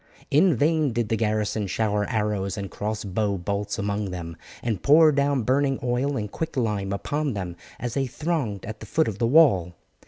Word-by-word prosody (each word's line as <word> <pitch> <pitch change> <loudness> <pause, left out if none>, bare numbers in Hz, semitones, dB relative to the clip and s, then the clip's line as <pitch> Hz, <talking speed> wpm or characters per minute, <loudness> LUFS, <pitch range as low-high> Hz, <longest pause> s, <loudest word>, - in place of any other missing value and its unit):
In 160 +3 +5
vain 150 0 +2
did 115 -2 -1
the 115 - +2
garrison 110 -1 0
shower 105 0 0
arrows 105 -4 -1
and 100 -1 -5
cross 105 +1 -3
bow 100 0 -1
bolts 100 +3 -3
among 100 -1 -2
them, 85 -2 -6 0.3
and 110 -6 -1
pour 155 +2 +6
down 140 -2 +1
burning 135 +3 +2
oil 125 +3 0
and 105 -2 -4
quicklime 110 -11 -2
upon 145 +6 -2
them 90 -3 -4 0.2
as 120 -3 -3
they 135 -1 0
thronged 140 - -2
at 110 0 -7
the 110 - -10
foot 160 +7 +1
of 105 -2 -4
the 115 - +2
wall. 115 - +4
110 Hz, 185 wpm, -25 LUFS, 100-140 Hz, 0.3 s, pour